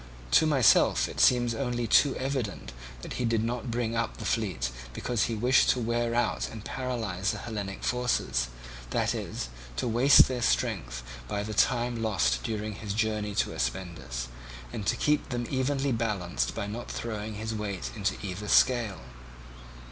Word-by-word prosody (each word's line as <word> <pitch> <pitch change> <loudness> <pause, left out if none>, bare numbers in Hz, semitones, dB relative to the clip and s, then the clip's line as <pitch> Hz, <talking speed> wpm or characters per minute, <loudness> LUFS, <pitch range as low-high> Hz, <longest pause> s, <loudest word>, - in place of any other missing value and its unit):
To 155 - +6
myself 135 -8 +4
it - - -7
seems 120 -2 +4
only 120 -1 -1
too 135 +4 +4
evident 130 - -3 0.3
that - - -6
he - - +1
did 115 -2 +1
not 120 0 -3
bring 115 -1 -1
up 115 0 -1
the - - -7
fleet 90 - -1 0.2
because 120 - 0
he 115 - -2
wished 125 +4 +4
to 125 - +3
wear 120 0 0
out 120 - 0
and 110 -2 -9
paralyse 110 -8 -2
the - - -5
Hellenic 100 -4 -5
forces, 125 - 0 0.4
that - - +1
is, - - -4 0.3
to 125 - -1
waste 120 +5 +7
their 125 -2 -3
strength - - 0 0.2
by 100 +7 -2
the 110 +1 -5
time 120 +1 +2
lost 65 - +1
during 110 - -3
his 100 0 -5
journey 105 -2 -1
to - - +1
Aspendus, 60 -2 -3 0.5
and 105 - -4
to - - +3
keep 150 0 +1
them 120 -2 -2
evenly 135 +1 0
balanced 105 -7 -1
by 115 - -2
not 115 +4 -6
throwing 110 -2 -4
his 110 +1 -4
weight 105 -4 -4
into 100 -3 -1
either 100 +2 -5
scale. 120 - +3
110 Hz, 165 wpm, -28 LUFS, 100-120 Hz, 0.5 s, waste